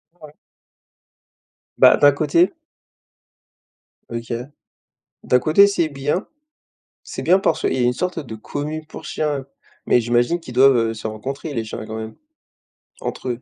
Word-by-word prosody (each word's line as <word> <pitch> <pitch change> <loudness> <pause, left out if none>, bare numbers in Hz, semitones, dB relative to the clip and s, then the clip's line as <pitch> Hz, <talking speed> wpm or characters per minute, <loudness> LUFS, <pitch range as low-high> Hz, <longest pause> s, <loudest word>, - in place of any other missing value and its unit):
Ah - - -33
ouais? 150 - -15 1.4
Bah, - - +7
d'un 145 - +6
côté 155 +5 +2 1.6
OK. 115 0 -5 0.9
D'un 125 - +3
côté 160 +9 +5
c'est 175 -6 0
bien. 145 +6 -2 0.8
C'est - - -6
bien 185 +2 +4
parce 195 - 0
qu'il - - +1
y - - -1
a - - 0
une 120 0 +3
sorte 180 +7 -3
de 130 -8 -6
commune 150 +7 -5
pour - - -10
chiens, 145 -3 -2 0.4
mais 125 - +4
j'imagine 120 +8 +1
qu'ils 125 -7 -10
doivent, 135 +1 +6
heu, 115 -1 0
se 110 - -6
rencontrer 135 +8 -5
les 115 -3 -2
chiens 110 - -7
quand 110 - -6
même, 110 0 -7 0.9
entre 130 - -4
eux, 120 0 -3
135 Hz, 155 wpm, -21 LUFS, 120-155 Hz, 1.6 s, Bah